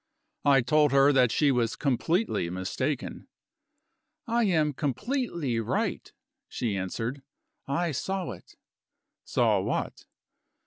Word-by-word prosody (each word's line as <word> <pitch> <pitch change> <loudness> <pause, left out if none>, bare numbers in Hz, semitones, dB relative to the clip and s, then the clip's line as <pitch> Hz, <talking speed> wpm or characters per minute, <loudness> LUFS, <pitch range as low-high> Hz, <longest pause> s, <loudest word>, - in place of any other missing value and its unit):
I 140 -2 +6
told 150 +3 +3
her 140 +1 +6
that 125 -3 +4
she 145 +2 +3
was 120 -2 0
completely 150 - 0
mistaken. 110 - -3 1.0
"I 235 -1 +1
am 155 -6 +2
completely 155 - -2
right," 115 - -2 0.4
she 115 -5 -2
answered; 115 +8 -3 0.5
"I 165 +5 0
saw 190 +6 -3
it." - - -13 0.7
"Saw - - +2
what?" - - -3
140 Hz, 105 wpm, -28 LUFS, 120-170 Hz, 1.0 s, I